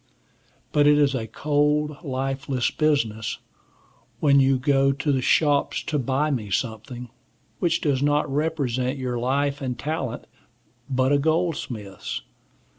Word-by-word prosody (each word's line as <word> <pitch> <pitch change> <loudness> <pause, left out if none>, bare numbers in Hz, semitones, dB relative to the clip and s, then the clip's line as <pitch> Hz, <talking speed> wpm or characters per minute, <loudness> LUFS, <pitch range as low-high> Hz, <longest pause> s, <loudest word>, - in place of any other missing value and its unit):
But 145 0 +4
it 150 0 +6
is 145 -2 +3
a 115 -4 -3
cold, 150 +2 +1
lifeless 135 -2 -1
business 115 -7 0 0.8
when 140 -2 +5
you 135 0 +4
go 135 +1 +3
to 135 +2 -1
the 135 -2 +1
shops 145 +2 +2
to 150 - -1
buy 135 +4 0
me 110 -7 -2
something, 115 +3 -4 0.5
which 170 -2 +1
does 140 -3 +1
not 145 +1 +2
represent 135 -3 -1
your 125 -2 -2
life 140 +3 0
and 125 -2 -3
talent, 145 -3 -3 0.6
but 130 0 +2
a 145 - +4
goldsmith's. 140 - -2
135 Hz, 130 wpm, -24 LUFS, 125-150 Hz, 0.8 s, it